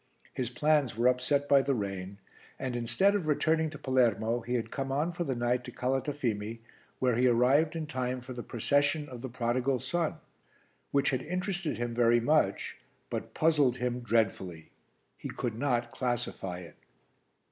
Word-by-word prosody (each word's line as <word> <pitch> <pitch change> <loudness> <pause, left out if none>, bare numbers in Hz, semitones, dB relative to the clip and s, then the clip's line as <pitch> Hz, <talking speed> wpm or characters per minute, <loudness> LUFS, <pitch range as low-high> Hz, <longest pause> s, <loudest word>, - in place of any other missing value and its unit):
His 125 -2 -2
plans 145 -2 +2
were 120 +2 +3
upset 125 +3 +2
by 140 -1 +6
the 135 0 0
rain 100 -2 -4 0.4
and, 130 -2 -3
instead 120 - +2
of 195 -6 -1
returning 160 +1 +2
to 150 - -9
Palermo, 120 -4 +2
he 120 +1 -3
had 115 - -2
come 135 -1 -3
on 150 +5 0
for 175 0 -3
the 135 -6 -2
night 120 +1 0
to 125 - -7
Calatafimi, 125 -4 -2 0.4
where 125 -2 +2
he 125 +2 +4
arrived 135 +7 +4
in 160 -1 -2
time 130 -3 -2
for 125 +1 -8
the 120 - -5
procession 145 +6 +1
of 125 -3 -9
The 130 - -5
Prodigal 125 +2 0
Son 160 +5 -1 0.7
which 140 0 +2
had 130 -2 0
interested 180 +1 -2
him 120 0 -2
very 120 0 +4
much 120 -5 +1 0.3
but - - -4
puzzled 150 -6 +3
him 125 -1 -1
dreadfully. 100 -8 -1 0.5
He - - -6
could 120 -3 -3
not 120 -1 0
classify 120 -8 -2
it. 85 - -13
125 Hz, 170 wpm, -30 LUFS, 120-145 Hz, 0.7 s, by